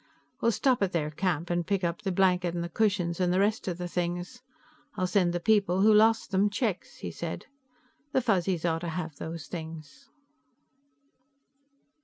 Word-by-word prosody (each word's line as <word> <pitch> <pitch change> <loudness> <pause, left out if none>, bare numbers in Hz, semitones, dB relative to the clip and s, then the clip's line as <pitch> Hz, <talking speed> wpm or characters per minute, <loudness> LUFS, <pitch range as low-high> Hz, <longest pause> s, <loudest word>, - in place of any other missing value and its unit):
"We'll 230 - +3
stop 255 +1 +2
at 195 -2 +1
their 155 -3 -1
camp 170 0 -1
and 175 -1 -1
pick 195 -2 0
up 170 +1 -1
the 195 -2 -2
blanket 180 -2 +2
and 170 - -2
the 170 - -4
cushions 185 -3 0
and 180 -1 +2
the 185 - +2
rest 210 +1 +1
of 175 -2 -2
the 180 0 -4
things. 175 +7 -3 0.5
I'll 185 - 0
send 180 -2 +2
the 175 - -1
people 195 -2 +2
who 215 +2 +6
lost 220 +1 +4
them 195 +2 +3
checks," 205 -3 -2
he - - -6
said. - - -5 0.7
"The 265 - +2
Fuzzies 185 -6 +1
ought 165 -1 +1
to 170 - -3
have 160 -2 -5
those 160 -2 -6
things." 160 -2 -9
180 Hz, 180 wpm, -28 LUFS, 170-200 Hz, 0.7 s, who